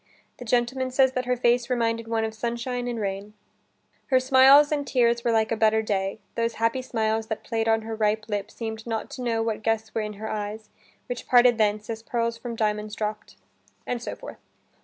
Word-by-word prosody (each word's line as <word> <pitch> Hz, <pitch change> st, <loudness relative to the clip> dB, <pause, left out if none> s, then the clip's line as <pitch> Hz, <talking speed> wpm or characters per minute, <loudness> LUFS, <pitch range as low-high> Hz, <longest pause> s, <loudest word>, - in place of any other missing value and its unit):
The 245 Hz, -, -9 dB
gentleman 250 Hz, +3 st, 0 dB
says 260 Hz, 0 st, +3 dB
that 255 Hz, -1 st, -2 dB
her 250 Hz, 0 st, +1 dB
face 240 Hz, 0 st, +2 dB
reminded 230 Hz, -2 st, 0 dB
one 225 Hz, -1 st, 0 dB
of 220 Hz, 0 st, -2 dB
sunshine 240 Hz, +2 st, -3 dB
and 240 Hz, -2 st, -3 dB
rain. 200 Hz, +1 st, -4 dB, 0.7 s
"Her 260 Hz, -, +4 dB
smiles 270 Hz, +3 st, +6 dB
and 290 Hz, -2 st, -1 dB
tears 235 Hz, -2 st, +2 dB
Were -, -, +1 dB
like 220 Hz, -1 st, +2 dB
a -, -, +2 dB
better 220 Hz, 0 st, +3 dB
day; 195 Hz, -2 st, -1 dB, 0.2 s
those 230 Hz, 0 st, -1 dB
happy 230 Hz, +3 st, 0 dB
smiles 220 Hz, -2 st, -1 dB
That 220 Hz, -, -4 dB
play'd 225 Hz, 0 st, -2 dB
on 225 Hz, 0 st, +2 dB
her 225 Hz, 0 st, -5 dB
ripe 215 Hz, 0 st, 0 dB
lip 205 Hz, -1 st, -3 dB
seem'd 220 Hz, 0 st, -6 dB
not 225 Hz, -1 st, -3 dB
to 255 Hz, -, -7 dB
know 230 Hz, -2 st, 0 dB
What 225 Hz, -1 st, -2 dB
guests 220 Hz, 0 st, -1 dB
were 225 Hz, -, 0 dB
in 210 Hz, 0 st, -4 dB
her 215 Hz, +2 st, -7 dB
eyes; 210 Hz, 0 st, -5 dB, 0.4 s
which 245 Hz, -1 st, -6 dB
parted 245 Hz, -2 st, +5 dB
thence, 210 Hz, 0 st, +1 dB
As 225 Hz, -1 st, -5 dB
pearls 230 Hz, 0 st, -1 dB
from 235 Hz, 0 st, -6 dB
diamonds 210 Hz, -1 st, -1 dB
dropp'd." 215 Hz, 0 st, -4 dB, 0.5 s
And 245 Hz, -1 st, -3 dB
so -, -, -5 dB
forth. -, -, -10 dB
225 Hz, 205 wpm, -25 LUFS, 220-245 Hz, 0.7 s, smiles